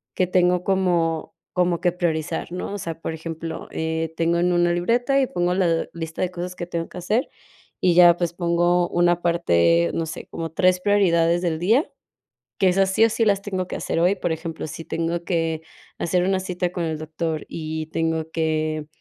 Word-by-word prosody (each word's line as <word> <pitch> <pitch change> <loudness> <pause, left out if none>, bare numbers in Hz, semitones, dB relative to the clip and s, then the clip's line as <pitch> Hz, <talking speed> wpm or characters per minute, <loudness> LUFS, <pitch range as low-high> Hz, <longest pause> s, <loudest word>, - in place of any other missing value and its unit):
que 185 - +1
tengo 180 0 +2
como 175 -4 +1 0.2
como 180 -2 +1
que 180 -1 +2
priorizar, 165 -3 -2
¿no? 180 +3 -4
O - - -3
sea, 165 -3 -5
por 165 - -4
ejemplo, 160 0 -6
eh, 160 0 -2
tengo 170 +1 +2
en 180 +1 +2
una 175 0 +3
libreta 240 +10 +2
y 260 - +1
pongo 175 -2 0
la 170 -3 +1
lista 165 -1 -5
de 185 - 0
cosas 180 0 -5
que 175 - -5
tengo 170 -1 -4
que - - -10
hacer, 215 - 0 0.5
y 180 - +3
ya, 175 -1 +7
pues, 175 -1 -1
pongo 175 0 +2
una 175 0 +2
parte, 85 - +3
no 165 - -1
sé, 160 - -7
como 165 -2 -5
3 180 +2 +3
prioridades 175 -4 +3
del 165 -3 0
día, 225 - +2 0.7
que 190 - +4
esas, 190 +1 +2
sí, 205 - +3
o - - +2
sí, 225 +1 +1
las 200 -2 +2
tengo 190 -3 -3
que - - -4
hacer 165 - -2
hoy. 180 +4 +3
Por 175 -3 -2
ejemplo, 160 0 -5
si 165 - -7
tengo 165 +1 -2
que 165 -2 -1 0.4
hacer 180 +1 +1
una 190 +1 +1
cita 180 -1 -2
con 175 -1 -3
el 160 -1 -2
doctor 155 0 -3
y 155 -1 -5
tengo 160 0 -1
que, 155 -1 -1
175 Hz, 200 wpm, -23 LUFS, 165-180 Hz, 0.7 s, ya